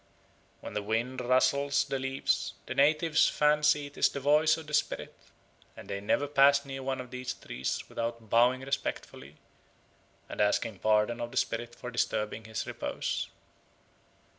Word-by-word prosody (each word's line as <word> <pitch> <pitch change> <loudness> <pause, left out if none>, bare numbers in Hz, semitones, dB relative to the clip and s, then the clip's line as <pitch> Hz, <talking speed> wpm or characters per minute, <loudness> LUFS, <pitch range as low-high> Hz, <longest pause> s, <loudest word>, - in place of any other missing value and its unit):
When - - -8
the 105 - -1
wind 115 +5 -2
rustles 140 +3 +2
the 135 - -3
leaves, 135 +1 -1
the - - -4
natives 155 +2 +3
fancy 150 0 +3
it 145 - -11
is - - +5
the - - -5
voice 150 +3 +4
of 160 - -8
the 150 - -10
spirit; 150 - -1 0.6
and - - -10
they 100 0 -4
never 125 +7 +1
pass 140 0 +4
near 135 -1 -6
one 130 0 -2
of 125 -1 -8
these 125 0 -4
trees 65 +2 -4
without 115 -1 -4
bowing 125 +4 +3
respectfully, 75 - -5 0.9
and - - -4
asking 105 0 +1
pardon 110 +2 +2
of 120 - -3
the - - -8
spirit 120 +1 -1
for 125 - -7
disturbing 110 -2 -2
his 110 0 -4
repose. - - -3
130 Hz, 160 wpm, -30 LUFS, 115-140 Hz, 0.9 s, is